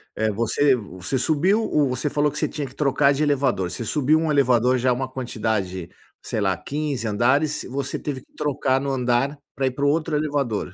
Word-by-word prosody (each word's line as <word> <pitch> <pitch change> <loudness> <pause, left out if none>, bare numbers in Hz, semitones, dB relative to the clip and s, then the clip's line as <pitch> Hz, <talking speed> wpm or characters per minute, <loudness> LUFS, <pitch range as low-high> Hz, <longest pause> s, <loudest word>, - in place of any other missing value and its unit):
eh, 110 0 0
você 115 +6 +2
você 100 +2 -4
subiu 165 - +2
ou 145 -9 +1
você 130 +3 -1
falou 145 0 +1
que 150 - -8
você - - +1
tinha 145 -3 -4
que - - -14
trocar 140 -1 +3
de 150 +2 0
elevador. 130 -11 +1
Você 90 +7 -5
subiu 150 +5 +2
um 160 -2 0
elevador, 130 -2 +3
já 125 +1 +2
uma 130 +1 -2
quantidade, 105 -8 -3 0.3
sei 110 - -3
lá, 95 -2 +1
15 140 -5 -3
andares, 130 +8 +1
você 135 +1 -3
teve 135 -4 -4
que - - -28
trocar 140 -3 0
no 140 - -2
andar 130 +3 0 0.2
pra 135 - 0
ir - - 0
para 140 +2 -2
o - - +4
outro 155 0 0
elevador. 140 -11 -1
135 Hz, 205 wpm, -23 LUFS, 120-145 Hz, 0.3 s, o